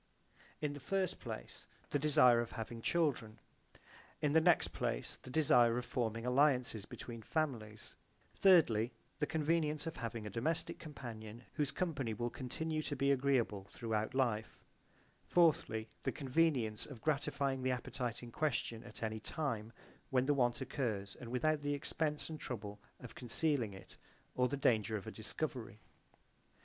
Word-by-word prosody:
In 150 -1 -1
the 145 - -7
first 190 +7 -1
place, - - -7 0.2
the 145 - +2
desire 125 -5 +6
of 120 - -5
having 115 0 -5
children, 125 -9 +1 0.8
in 150 -2 +1
the 160 - +6
next 175 0 +4
place - - -2
the - - -12
desire 125 -5 +5
of 125 - -2
forming 115 -1 -1
alliances 125 -5 +3
between 115 -2 -7
families, 115 -7 -3 0.4
thirdly 130 - +5 0.3
the 150 - +1
convenience 155 -1 +1
of 165 - -4
having 115 -2 -4
a - - -3
domestic 160 - -1
companion 120 -6 -8
whose 150 -3 0
company 140 - -1
will 120 +3 -2
continue 155 +4 -2
to 145 - -3
be 140 +1 +3
I - - +7
agreeable 125 -7 +1
throughout 110 +1 -2
life, 115 -5 0 0.6
fourthly 145 -10 +3
the - - 0
convenience 130 -6 +1
of 135 -5 -9
gratifying 140 -3 0
the 130 - +1
appetite 125 -1 -3
in 120 - -8
question 120 -5 -1
at - - -9
any 110 0 -2
time 115 -4 -3 0.4
when 130 -1 +3
the 145 - +4
want 125 -2 +2
occurs 110 -7 -2
and 120 - -7
without 150 +5 +1
the 145 0 0
expense 150 +1 -2
and 155 -1 -6
trouble 105 -6 -5 0.2
of 125 - -9
concealing 125 -4 0
it 95 - -12 0.4
or 125 0 +3
the 140 - -2
danger 110 -5 +2
of 100 - -8
a - - -5
discovery. - - -4
125 Hz, 155 wpm, -36 LUFS, 115-150 Hz, 0.8 s, I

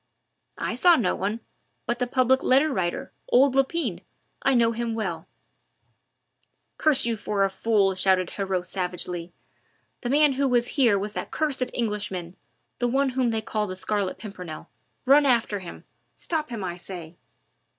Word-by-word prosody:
"I - - -2
saw 350 -1 +5
no 215 - +1
one 210 +4 -3 0.4
but 240 0 -2
the 250 - 0
Public 260 +1 +2
Letter 275 +3 +3
Writer, 175 -6 -2 0.2
old 260 +2 +4
Lepine 270 - 0 0.4
I 270 - +2
know 230 -1 +4
him 230 0 -3
well 220 - -4 0.7
" - - -46
"Curse 305 -6 +5
you 235 -1 +1
for 210 -2 -1
a 195 - +1
fool!" 200 -1 +2
shouted 185 -1 +2
Heriot 190 -3 -2
savagely, 180 -1 -3 0.7
"the 240 - -3
man 290 +1 +4
who 275 +1 +1
was 245 -2 +2
here 240 -8 +3
was 205 +2 -4
that - - -5
cursed 270 -5 -1
Englishman 200 -6 -2 0.4
the 245 - +1
one 270 +3 +1
whom 255 -1 0
they 225 -1 -1
call 215 -1 -2
the 185 - -5
Scarlet 200 0 -1
Pimpernel. 185 -6 -9 0.3
Run 280 +2 +5
after 230 -5 +2
him 180 -2 -10 0.3
stop 310 -4 -3
him, 230 -5 -5
I 175 -1 -4
say!" 175 -2 -9
225 Hz, 160 wpm, -25 LUFS, 190-260 Hz, 0.7 s, saw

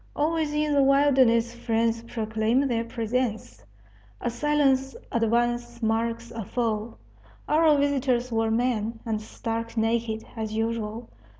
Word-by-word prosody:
Always 315 0 0
in 300 0 +1
the 285 - +4
wilderness 265 -4 +4
friends 230 -1 0
proclaim 225 +3 0
their 230 -3 0
presence; 225 - -3 0.6
a - - -2
silent 270 0 +1 0.2
advance 240 +1 0
marks 230 +1 -1
a 225 - -5
foe. 225 +1 -2 0.5
Our 310 -1 +4
visitors 260 -3 +1
were 225 0 +1
men, 225 -1 0
and 220 -2 -2
stark 230 +1 -5
naked, 225 0 0
as 220 -1 -4
usual. 225 0 -2
235 Hz, 120 wpm, -26 LUFS, 225-260 Hz, 0.6 s, the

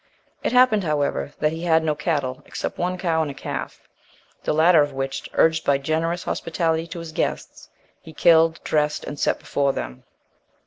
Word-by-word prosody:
It - - -1
happened, 250 -5 +4
however, 145 -3 -1
that 150 - +2
he 165 +1 -6
had 160 -2 +3
no 155 -1 +1
cattle, 145 -5 -2
except - - -5
one 180 +1 -1
cow 165 -3 0
and 155 - -1
a 140 - -7
calf, - - -6 0.6
the - - 0
latter 160 +1 +5
of 145 -1 -1
which, 135 0 -4
urged 160 0 +3
by 140 - +3
generous 165 +5 -1
hospitality 165 0 -1
to 170 - -8
his 165 -1 -7
guests, - - -4 0.3
he 160 - -12
killed, 165 0 +4
dressed 150 -1 0
and 145 - -7
set - - +1
before 140 -1 0
them. 65 +1 -6
160 Hz, 180 wpm, -23 LUFS, 145-165 Hz, 0.6 s, latter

